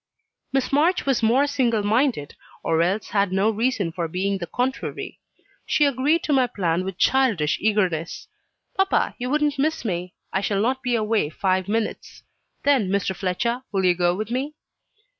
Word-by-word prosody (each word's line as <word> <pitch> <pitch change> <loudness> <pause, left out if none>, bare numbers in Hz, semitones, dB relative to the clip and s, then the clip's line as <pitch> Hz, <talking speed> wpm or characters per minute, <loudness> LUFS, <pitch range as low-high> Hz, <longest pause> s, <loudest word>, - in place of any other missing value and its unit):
Miss 270 -1 0
March 330 +6 +2
was 270 -3 +1
more 240 +6 +4
single 240 -7 +1
minded, 220 - +1 0.3
or 160 0 +2
else 190 +5 0
had 200 -2 +1
no 195 +4 +2
reason 220 -5 0
for 170 0 -3
being 195 +4 -1
the 175 - -5
contrary. 260 +6 -3 0.5
She 295 - +3
agreed 285 +5 +1
to 300 - 0
my 260 -2 +4
plan 180 -5 -1
with 190 -1 -5
childish 225 - +2
eagerness. 185 -6 0 0.5
"Papa, 385 0 +1
you 250 +1 -3
wouldn't 295 0 +1
miss 310 -1 0
me 180 -3 -3 0.2
I 195 - +1
shall 200 0 0
not 255 +5 0
be 250 -2 0
away 215 -7 +1
five 185 +3 0
minutes. 220 +1 -3 0.4
Then, 265 -9 +3
Mr. 195 -1 0
Fletcher, 220 +7 -1
will 195 -2 0
you 180 - +5
go 175 0 +1
with 215 +3 -4
me?" 275 +5 -2
215 Hz, 170 wpm, -23 LUFS, 185-265 Hz, 0.5 s, you